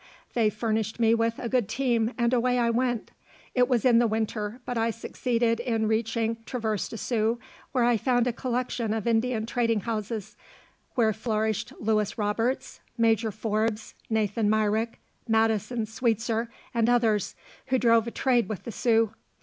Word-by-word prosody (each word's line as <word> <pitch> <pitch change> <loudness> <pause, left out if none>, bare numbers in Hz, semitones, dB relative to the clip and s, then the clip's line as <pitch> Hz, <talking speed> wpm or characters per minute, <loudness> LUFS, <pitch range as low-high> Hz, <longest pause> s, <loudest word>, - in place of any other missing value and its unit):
They 225 -3 +3
furnished 220 +1 -2
me 225 -1 +4
with 230 0 +1
a 240 - -4
good 240 -4 +1
team, 235 -1 +1
and 235 0 +2
away 250 0 +2
I 235 -1 +2
went. 240 -1 -1 0.4
It 250 -1 +3
was 245 -3 +1
in 240 -2 +6
the 240 - +4
winter, 220 +1 -2
but 245 - -3
I 225 0 +1
succeeded 230 0 -1
in 225 -3 0
reaching 225 +1 0
Traverse 220 -5 -2
des 225 - -6
Sioux, 225 0 0 0.3
where 250 -3 +2
I 240 -1 +4
found 245 +1 +2
a 245 - 0
collection 240 -2 -2
of 220 - -3
Indian 230 -1 +1
trading 230 -2 +1
houses, 220 -2 -4 0.6
where 220 -3 +3
flourished 220 -1 -1
Louis 215 -1 0
Roberts, 225 +5 -1 0.2
Major 225 -1 +3
Forbes, 215 +1 -2 0.2
Nathan 215 -1 +1
Myrick, 215 +1 +1 0.3
Madison 225 +1 +1
Sweetzer 225 0 -1 0.2
and 230 0 +2
others, 225 -5 +2 0.3
who 260 0 +2
drove 230 -2 +4
a - - -3
trade 245 -3 +1
with 210 -5 -5
the 235 - -6
Sioux. 225 -1 +2
230 Hz, 160 wpm, -27 LUFS, 220-240 Hz, 0.6 s, in